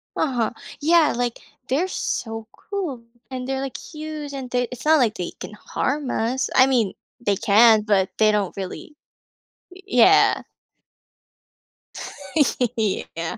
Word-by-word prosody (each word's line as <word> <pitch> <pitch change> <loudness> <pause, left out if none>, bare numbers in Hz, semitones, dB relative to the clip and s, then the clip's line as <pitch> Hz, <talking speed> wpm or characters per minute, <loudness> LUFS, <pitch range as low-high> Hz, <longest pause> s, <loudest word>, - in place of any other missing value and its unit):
Uh-huh, 245 -7 0 0.3
yeah, 325 +1 +4
like, 240 -1 -2 0.3
they're 315 +8 +1
so 225 -10 -4
cool 345 - -5 0.3
and 255 -1 -5
they're, 270 0 -2
like, 270 -1 -5
huge 305 -2 -7
and 265 -2 -6
they 245 -1 0
it's 250 +3 -8
not 315 -1 +5
like 225 -4 +2
they 175 - -4
can - - -8
harm 270 +5 -2
us, 245 +4 -1
I 260 - +7
mean 235 -7 +1 0.3
they 205 -4 +1
can, 220 +2 +5
but 195 -3 +2
they 215 -1 +5
don't 205 -3 -1
really 195 +10 -7 0.8
y 370 +1 -14
yeah. 365 +12 +5 2.4
Yeah. 185 -6 -2
250 Hz, 135 wpm, -23 LUFS, 220-290 Hz, 2.4 s, I